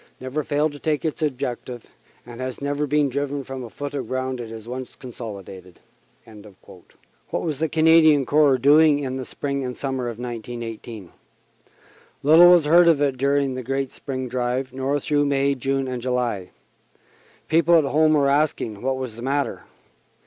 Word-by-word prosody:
never 130 Hz, +4 st, -3 dB
failed 150 Hz, +1 st, 0 dB
to 145 Hz, -, -11 dB
take 155 Hz, +1 st, -1 dB
its 160 Hz, 0 st, -3 dB
objective, 125 Hz, -4 st, -4 dB, 0.4 s
and 120 Hz, +1 st, -10 dB
has 130 Hz, 0 st, -5 dB
never 145 Hz, +1 st, -2 dB
been 150 Hz, 0 st, +2 dB
driven 140 Hz, +1 st, -3 dB
from 135 Hz, -1 st, -7 dB
a 120 Hz, -, -8 dB
foot 145 Hz, +4 st, -6 dB
of 135 Hz, -5 st, -4 dB
ground 130 Hz, 0 st, -3 dB
it 115 Hz, -2 st, -6 dB
has 110 Hz, 0 st, -10 dB
once 125 Hz, +1 st, -7 dB
consolidated." 100 Hz, -7 st, -10 dB, 1.5 s
What -, -, -2 dB
was 155 Hz, -5 st, -3 dB
the 160 Hz, 0 st, 0 dB
Canadian 155 Hz, -3 st, +5 dB
Corps 145 Hz, -2 st, +4 dB
doing 145 Hz, +3 st, +5 dB
in 130 Hz, -2 st, -4 dB
the 130 Hz, -, -5 dB
spring 140 Hz, +1 st, -4 dB
and 125 Hz, -1 st, -5 dB
summer 130 Hz, -2 st, -3 dB
of 115 Hz, -, -7 dB
1918? 115 Hz, -4 st, -7 dB, 1.1 s
Little 160 Hz, +5 st, +8 dB
was 175 Hz, -3 st, +6 dB
heard 170 Hz, +3 st, +6 dB
of 165 Hz, -4 st, +4 dB
it 140 Hz, -2 st, +1 dB
during 140 Hz, +1 st, +1 dB
the 130 Hz, -, -4 dB
great 135 Hz, +1 st, -3 dB
spring 130 Hz, -2 st, -5 dB
drive, 125 Hz, +1 st, -2 dB
nor 135 Hz, +2 st, -1 dB
through 145 Hz, +1 st, +1 dB
May, 140 Hz, 0 st, +1 dB
June 135 Hz, +1 st, -2 dB
and 125 Hz, -1 st, -4 dB
July. 120 Hz, -7 st, -2 dB, 1.0 s
People 170 Hz, +1 st, +4 dB
at 160 Hz, -, +3 dB
home 155 Hz, +2 st, +3 dB
were 145 Hz, -2 st, +3 dB
asking 140 Hz, -7 st, 0 dB
what 130 Hz, +1 st, -1 dB
was 130 Hz, -4 st, -5 dB
the 115 Hz, -, -10 dB
matter. 140 Hz, +2 st, -2 dB
135 Hz, 170 wpm, -23 LUFS, 125-145 Hz, 1.5 s, Little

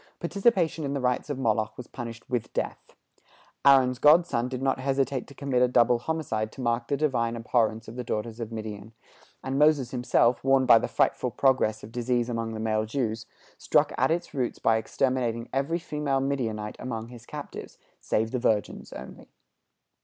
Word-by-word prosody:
Participation 175 Hz, -3 st, +1 dB
in 140 Hz, 0 st, -2 dB
the -, -, -1 dB
rites 125 Hz, +2 st, -1 dB
of 145 Hz, -, -2 dB
Moloch 110 Hz, -3 st, 0 dB
was 125 Hz, -, -7 dB
punished 115 Hz, -2 st, -8 dB
with 120 Hz, -3 st, -2 dB
death. -, -, -4 dB, 0.7 s
Aaron's 130 Hz, -3 st, +5 dB
grandson 150 Hz, -6 st, +4 dB
did 130 Hz, -1 st, -4 dB
not 135 Hz, 0 st, 0 dB
hesitate 135 Hz, -1 st, -1 dB
to 140 Hz, -, -14 dB
commit 135 Hz, -3 st, 0 dB
a 125 Hz, -, +5 dB
double 120 Hz, -1 st, +3 dB
homicide 120 Hz, -7 st, -2 dB
to -, -, -14 dB
mark 120 Hz, -1 st, 0 dB
the 140 Hz, -, 0 dB
Divine 120 Hz, -6 st, 0 dB
abhorrence 115 Hz, -1 st, 0 dB
of 115 Hz, -, -9 dB
the 125 Hz, -, -3 dB
daughters 115 Hz, 0 st, -4 dB
of 115 Hz, -1 st, -5 dB
Midian; 110 Hz, -1 st, -7 dB, 0.5 s
and 135 Hz, +1 st, -2 dB
Moses 150 Hz, -5 st, +4 dB
himself, 125 Hz, -1 st, +2 dB
warned 135 Hz, 0 st, +4 dB
by 115 Hz, -, +7 dB
the -, -, -2 dB
frightful 125 Hz, -, +1 dB
progress 120 Hz, -4 st, +1 dB
of 105 Hz, -, -10 dB
disease 120 Hz, 0 st, 0 dB
among 115 Hz, -1 st, -3 dB
the -, -, -5 dB
male 110 Hz, 0 st, 0 dB
Jews, 110 Hz, -2 st, -2 dB, 0.3 s
struck -, -, +2 dB
at 130 Hz, -, +2 dB
its 170 Hz, +2 st, -2 dB
roots 130 Hz, -4 st, -2 dB
by 110 Hz, 0 st, +2 dB
exterminating 120 Hz, 0 st, -1 dB
every 140 Hz, +5 st, 0 dB
female 150 Hz, -5 st, -1 dB
Midianite 115 Hz, -6 st, -2 dB
among 115 Hz, -2 st, -5 dB
his 120 Hz, -1 st, -13 dB
captives, 150 Hz, -1 st, -8 dB, 0.2 s
save 110 Hz, +1 st, -1 dB
the 125 Hz, -, -1 dB
virgins 105 Hz, -4 st, -1 dB
only. 65 Hz, -, -10 dB
125 Hz, 180 wpm, -27 LUFS, 115-135 Hz, 0.7 s, by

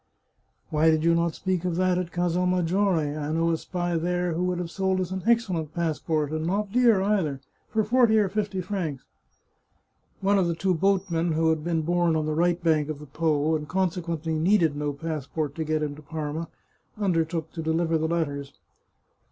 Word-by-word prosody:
" -, -, -44 dB
Why 155 Hz, +1 st, +4 dB
did 160 Hz, -1 st, +2 dB
you 170 Hz, 0 st, +4 dB
not 170 Hz, -1 st, +1 dB
speak 185 Hz, -2 st, -1 dB
of 180 Hz, -2 st, -1 dB
that 185 Hz, 0 st, +2 dB
at 180 Hz, -1 st, -4 dB
Casal 175 Hz, +1 st, 0 dB
Maggiore? 180 Hz, -3 st, +1 dB
I 150 Hz, 0 st, -3 dB
know 165 Hz, +1 st, +1 dB
a 165 Hz, -, +1 dB
spy 175 Hz, -2 st, -2 dB
there 175 Hz, +1 st, 0 dB
who 170 Hz, +3 st, -1 dB
would 180 Hz, -1 st, 0 dB
have 175 Hz, -1 st, -4 dB
sold 190 Hz, -1 st, 0 dB
us 185 Hz, -1 st, -2 dB
an 190 Hz, 0 st, -3 dB
excellent 185 Hz, -10 st, +1 dB
pass 165 Hz, -3 st, -1 dB
port, 155 Hz, -3 st, -1 dB
and 155 Hz, +1 st, -2 dB
not 200 Hz, +2 st, -1 dB
dear 230 Hz, -5 st, +4 dB
either, 185 Hz, -9 st, 0 dB, 0.3 s
for 220 Hz, -1 st, +1 dB
forty 230 Hz, 0 st, +4 dB
or 210 Hz, -2 st, +3 dB
fifty 200 Hz, -1 st, -2 dB
francs." 175 Hz, -8 st, -4 dB, 1.1 s
One 200 Hz, +1 st, +3 dB
of 180 Hz, -, +2 dB
the 170 Hz, -, -1 dB
two 185 Hz, +3 st, +1 dB
boatmen, 175 Hz, -2 st, +1 dB
who 160 Hz, +1 st, +2 dB
had 160 Hz, -1 st, -1 dB
been 165 Hz, -1 st, 0 dB
born 175 Hz, 0 st, +2 dB
on 155 Hz, -1 st, 0 dB
the 155 Hz, -, -1 dB
right 170 Hz, +2 st, +2 dB
bank 155 Hz, -3 st, +2 dB
of 155 Hz, -, -3 dB
the 150 Hz, -, -10 dB
Po, 155 Hz, +1 st, +1 dB
and 150 Hz, -1 st, -4 dB
consequently 170 Hz, -3 st, -1 dB
needed 165 Hz, -1 st, +3 dB
no 145 Hz, 0 st, -1 dB
passport 150 Hz, 0 st, -4 dB
to 160 Hz, -, -3 dB
get 155 Hz, 0 st, 0 dB
him 145 Hz, -1 st, -3 dB
to 150 Hz, -, -12 dB
Parma, 155 Hz, +1 st, -4 dB, 0.5 s
undertook 165 Hz, -5 st, 0 dB
to 165 Hz, -, -5 dB
deliver 160 Hz, 0 st, +1 dB
the 160 Hz, -, 0 dB
letters. 145 Hz, -4 st, -2 dB
165 Hz, 200 wpm, -26 LUFS, 155-185 Hz, 1.1 s, Why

